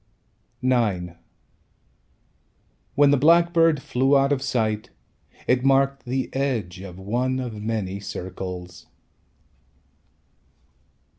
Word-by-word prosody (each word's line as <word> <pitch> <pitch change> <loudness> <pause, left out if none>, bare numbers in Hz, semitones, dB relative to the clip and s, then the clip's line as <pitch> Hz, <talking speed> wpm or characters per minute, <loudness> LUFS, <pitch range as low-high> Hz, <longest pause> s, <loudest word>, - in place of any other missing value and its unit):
IX 105 -9 +1 1.8
When 145 0 +5
the 145 - +4
blackbird 165 0 +4
flew 135 +3 +2
out 135 +1 +2
of 140 -2 +1
sight, 110 -5 -1 0.6
It 125 0 +2
marked 135 0 +2
the 130 +1 -2
edge 120 -10 -2
Of 90 -2 -9
one 125 +7 -1
of 115 -5 -5
many 105 -3 -3
circles. 90 -2 -7
125 Hz, 90 wpm, -24 LUFS, 100-135 Hz, 1.8 s, When